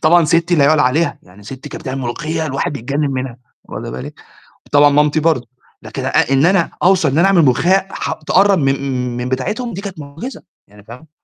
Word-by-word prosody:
طبعًا 170 +1 +5
سِتِّي 170 +3 +2
لا 145 -3 +4
يُعلى 155 +1 +4
عليها، 150 +7 +1
يعني 95 +3 -18
سِتِّي 130 +6 -9
كانت - - -9
بتعمل 135 +1 -4
ملوخية 155 +6 -3
الواحد 145 +1 -2
يتجنِّن 140 +3 -2
منها، 130 -2 -4 0.3
واخدة - - -7
بالِك، 65 0 -8 0.5
وطبعًا 145 0 +5
مامتي 150 +2 +2
برضه، 150 -7 0 0.3
لكن - - -6
أ - - 0 0.2
إن 135 +4 +4
أنا 185 -3 +2
أوصل 180 -4 +4
إن 140 - 0
أنا 175 - +5
أعمل 180 -4 +4
ملوخية 180 +9 +2
ح - - -4
تقرّب 195 +5 +2
من 135 -2 +2 0.4
م - - -5
من 125 +1 -3
بتاعتهم 210 - -3
دي 195 - -5
كانت 195 -4 -8
معجزة، 150 - -8 0.3
يعني 105 0 -18
فاهمة؟ 125 +8 -13
150 Hz, 205 wpm, -17 LUFS, 130-170 Hz, 0.5 s, طبعًا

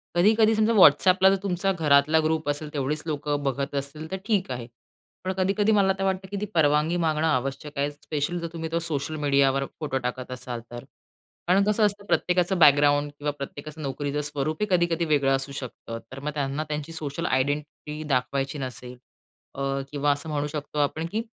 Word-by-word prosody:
कधी-कधी 215 +4 +4
समजा 220 +1 +3
WhatsAppला 185 +1 +6
जर 195 - +3
तुमचा 195 0 0
घरातला 155 -2 +4
ग्रुप 155 -1 0
असेल, 150 +1 -2
तेवढीच 145 +2 -1
लोकं 145 -1 -2
बघत 140 +1 -2
असतील 140 +3 -4
तर 190 - -2
ठीक 200 - 0
आहे. 120 -1 -5 0.6
पण 190 - -1
कधी-कधी 200 +3 +2
मला 195 -2 +4
तर - - 0
वाटतं, 190 0 -1
की 200 - -3
ती - - 0
परवानगी 155 +1 +3
मागणं 160 -1 +1
आवश्यक 140 +1 -2
आहे, 145 +1 0
स्पेशल 150 +3 -3
जर 170 - -4
तुम्ही 160 -1 -5
तो 165 - +1
सोशल 155 -2 -3
मीडियावर 140 -2 +2
फोटो 145 -4 -2
टाकत 130 0 -4
असाल 125 -1 -5
तर. 120 0 -7 0.6
कारण 190 +3 +4
कसं 210 +1 +3
असतं, 205 0 -1
प्रत्येकाचं 180 -1 +1
बॅकग्राऊंड 145 -1 +5
किंवा 145 0 -1
प्रत्येकाचं 150 +3 -7
नोकरीचं 145 +1 -2
स्वरूपही 150 +5 -2
कधी-कधी 170 -2 +2
वेगळं 140 -3 +3
असू 135 +1 -4
शकतं. 120 -3 -7
तर 130 - -7
मग 150 +2 -3
त्यांना 140 +1 -2
त्यांची 150 +1 -4
सोशल 160 +1 -4
आयडेंटिटी 150 +3 -2
दाखवायची 135 +2 -1
नसेल 125 -1 -7 0.6
अ, 135 - -5 0.3
किंवा 145 0 +1
असं 145 +3 -3
म्हणू 145 -1 -1
शकतो 150 0 -5
आपण 155 +3 0
की 220 - -1
150 Hz, 180 wpm, -25 LUFS, 140-175 Hz, 0.6 s, WhatsAppला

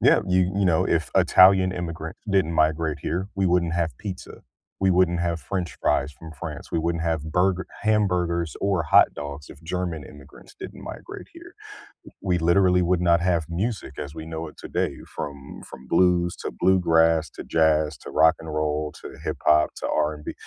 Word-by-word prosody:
Yeah, - - +5
you 90 0 +2
you 100 - +2
know, 85 -3 +3
if 80 -2 0
Italian 95 0 +6
immigrants 85 -2 -6
didn't 95 -4 +2
migrate 80 -1 +1
here, 95 +4 -2
we 95 -1 +1
wouldn't 85 -1 +1
have 85 -2 -1
pizza. 95 -4 -8 0.4
We 95 -1 +3
wouldn't 90 -1 +2
have 85 -1 -1
french 90 +1 -4
fries 75 +2 +1
from 80 +2 -12
France, - - -7
we - - 0
wouldn't 85 0 -1
have 80 -2 -2
burger 95 +1 +1 0.2
hamburgers 90 -6 +1
or 95 -5 0
hot - - +6
dogs 75 0 -7
if 70 - -13
German 85 -3 -3
immigrants 70 -2 -15
didn't - - -9
migrate - - -9
here, - - -14 0.7
we 90 -3 +1
literally 90 +2 +3
would 90 0 +1
not 85 -1 +3
have 85 -3 +1
music 95 - -3
as 75 +1 -7
we 80 0 -7
know 80 0 -5
it 75 - -13
today - - -2 0.2
from 70 -1 -7
from 65 - -12
blues, 90 -1 +2
to - - -5
bluegrass, 80 -3 +3
to - - -9
jazz, 80 -1 +2
to - - -10
rock 80 0 +5
and 80 -1 -8
roll, 75 0 -1
to - - -9
hip - - -3
hop, 75 0 +5
to - - -4
R&B 75 0 -2
85 Hz, 180 wpm, -24 LUFS, 80-90 Hz, 0.7 s, Italian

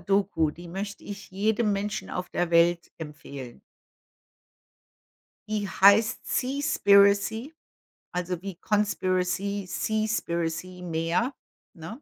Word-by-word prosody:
Doku, 195 -4 +1
die 175 +3 -11
möchte 200 +3 -5
ich 205 0 -8
jedem 210 +2 +1
Menschen 200 +1 -3
auf 180 0 -4
der 175 -1 -1
Welt 170 0 +3
empfehlen. 140 -5 -9 1.9
Die 210 -1 -1
heißt 200 +4 +5
„Seaspiracy“, 225 -3 +3 0.6
also, 180 -1 -3
wie 195 -1 -6
Conspiracy, 200 0 0
Seaspiracy. 180 -4 -2
Meer, 170 - -1 0.4
ne? 170 - -9
195 Hz, 95 wpm, -27 LUFS, 170-210 Hz, 1.9 s, heißt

